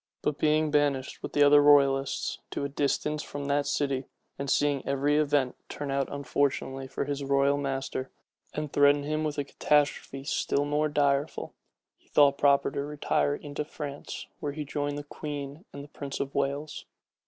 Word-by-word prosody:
But 150 -1 -1
being 155 0 +2
banished, 145 -3 +1
with - - -6
the 145 - +5
other 145 0 +7
royalists, 140 -2 +3
to - - -3
a - - -3
distance 150 +2 0
from 145 0 -6
that 145 0 +1
city, 135 -2 0 0.3
and 140 0 -3
seeing 145 -1 +2
every 140 +2 +1
event 145 -4 +2
turn 145 -1 -4
out 135 -1 -1
unfortunately 135 -1 -1
for - - -3
his 145 -1 -3
royal 140 +1 +3
master, 135 -2 -3 0.4
and 150 -1 -4
threaten 145 0 +5
him 155 +1 -1
with 150 -1 -2
a 145 - 0
catastrophe 145 -1 0
still 145 -1 0
more 150 +1 +1
direful, 145 0 0 0.5
he - - -32
thought 140 -1 +4
proper 140 -1 +4
to 140 - -2
retire 145 0 0
into 145 0 -5
France, 145 -1 -7
where 145 -3 -3
he 150 0 -5
joined 145 0 -2
the 145 - -5
queen 145 +2 -6
and 140 - -8
the - - -11
prince 140 -1 -5
of 140 0 -3
Wales. 140 +2 -2
145 Hz, 175 wpm, -28 LUFS, 140-145 Hz, 0.5 s, other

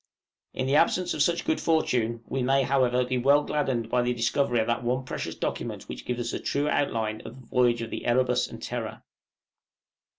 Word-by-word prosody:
In 130 - -1
the 135 +2 +3
absence 180 +2 +2
of 150 - -2
such 170 +3 +1
good 160 - 0
fortune 120 -8 +1
we 135 - -2
may, 135 +2 +3
however, 125 -2 +2 0.2
well 140 +2 +5
be - - -7
gladdened 130 -6 0
by 125 - +3
the 120 0 0
discovery 120 +1 +1
of 110 - +1
that 120 +1 -1
one 130 +2 -1
precious - - -4
document - - -4
which - - -8
gives 125 -1 -2
us 120 +1 -3
a - - -2
true 145 +1 -1
outline 110 -7 0
of 120 - -10
the 125 - -15
voyage 120 -1 +2
of 115 - -7
the - - -5
'Erebus' 125 +1 +2
and - - -10
'Terror.' - - -5
125 Hz, 205 wpm, -27 LUFS, 120-140 Hz, 0.2 s, well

